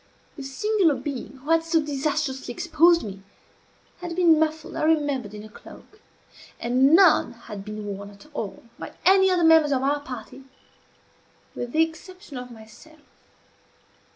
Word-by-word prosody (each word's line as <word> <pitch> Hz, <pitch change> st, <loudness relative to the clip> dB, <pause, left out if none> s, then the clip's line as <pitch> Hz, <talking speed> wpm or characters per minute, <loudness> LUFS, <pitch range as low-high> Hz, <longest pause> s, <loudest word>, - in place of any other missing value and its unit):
The 290 Hz, -, -9 dB
singular 330 Hz, +4 st, +1 dB
being 265 Hz, 0 st, -6 dB
who 305 Hz, -, -3 dB
had 330 Hz, 0 st, +3 dB
so 325 Hz, 0 st, +1 dB
disastrously 285 Hz, -2 st, -2 dB
exposed 335 Hz, +4 st, +3 dB
me, 195 Hz, -2 st, -8 dB, 0.8 s
had 350 Hz, -1 st, -6 dB
been 335 Hz, -3 st, +4 dB
muffled, 315 Hz, +2 st, -2 dB
I -, -, -3 dB
remembered, 285 Hz, -9 st, 0 dB
in 210 Hz, -, -9 dB
a -, -, -10 dB
cloak; 420 Hz, -, -16 dB, 0.6 s
and 260 Hz, +5 st, +3 dB
none 370 Hz, -3 st, +5 dB
had 215 Hz, -4 st, -10 dB
been 210 Hz, 0 st, -7 dB
worn 200 Hz, 0 st, -6 dB
at 200 Hz, +4 st, -17 dB
all 210 Hz, -8 st, -6 dB, 0.2 s
by -, -, -8 dB
any 380 Hz, 0 st, +5 dB
of 365 Hz, -, +2 dB
the 345 Hz, -, +1 dB
members 320 Hz, -2 st, +5 dB
of 265 Hz, -1 st, 0 dB
our 285 Hz, +2 st, +1 dB
party, 260 Hz, -1 st, -10 dB, 1.1 s
with 245 Hz, 0 st, -6 dB
the 320 Hz, +4 st, +4 dB
exception 340 Hz, 0 st, -9 dB
of 250 Hz, 0 st, -7 dB
myself. 240 Hz, +8 st, -16 dB
290 Hz, 155 wpm, -24 LUFS, 245-325 Hz, 1.1 s, none